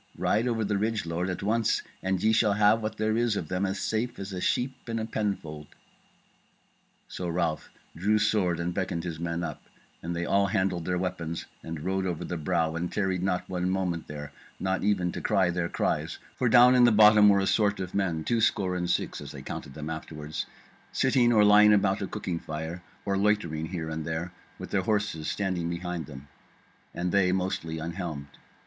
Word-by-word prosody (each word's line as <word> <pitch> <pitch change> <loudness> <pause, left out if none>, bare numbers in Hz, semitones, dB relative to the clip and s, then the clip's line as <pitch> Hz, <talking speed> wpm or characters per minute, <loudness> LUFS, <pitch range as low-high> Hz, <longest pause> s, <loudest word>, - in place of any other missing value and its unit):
Ride 110 +4 +1
over 115 -3 0
the 100 -1 0
ridge, 110 -1 -1
lord, 85 +2 -2
at 95 - -4
once, 110 +2 +1 0.2
and 95 -1 -1
ye 110 +1 +4
shall 110 -2 +3
have 105 +2 +4
what 110 0 -4
there 110 0 +1
is 115 -2 +1
of 80 - -4
them 95 +2 0
as 95 +1 -2
safe 120 +2 -2
as 95 0 -6
a 90 - -4
sheep 130 0 -1
in 115 - -1
a 110 - -2
penfold." 85 -10 -3 1.4
So 90 - -5
Ralph 85 -2 -1 0.3
drew 105 +6 +2
sword 105 -5 +1
and 85 +1 -2
beckoned 90 -3 -2
his 85 -3 -5
men 85 0 -2
up, - - -5 0.4
and 85 +1 -4
they 85 +1 -2
all 100 +3 +3
handled 95 -4 0
their 90 -1 0
weapons 85 -2 -3 0.2
and 80 -2 -6
rode 95 +2 -1
over 85 -3 -3
the 90 - -4
brow, 80 0 0
and 85 +1 -3
tarried 95 -3 0
not 90 -1 -1
one 90 0 -1
moment 90 -3 -1
there, 75 -1 -7 0.3
not 95 0 -1
even 95 -4 +1
to - - -5
cry 95 -2 +2
their 85 -1 -1
cries; - - -1 0.2
for 125 - +1
down 125 +1 +7
in 125 -1 +6
the 120 - +6
bottom 105 -1 +7
were 100 - +5
a 95 - +1
sort 105 -1 +2
of 90 -1 -5
men, 85 -5 0
two 115 +4 +1
score 95 -5 +1
and 90 -1 -2
six 90 - -1
(as - - -8
they - - -9
counted 70 - -7
them 75 +1 -5
afterward) 75 -1 -7 0.6
sitting 125 -2 +3
or 110 -3 +5
lying 105 +1 +7
about 100 -1 +2
a 95 - -2
cooking 90 -5 -4
fire, 80 +3 -5 0.2
or 100 -1 0
loitering 90 -7 +1
here 80 -3 -4
and 80 0 -3
there, 80 +3 -4 0.2
with - - -8
their 100 - +2
horses 105 -6 -1
standing 95 -4 -1
behind 85 -2 -4
them, 70 -1 -10 0.6
and 90 +1 -2
they 95 -1 +3
mostly 90 -3 -2
unhelmed. 80 -3 -5
95 Hz, 205 wpm, -28 LUFS, 85-105 Hz, 1.4 s, down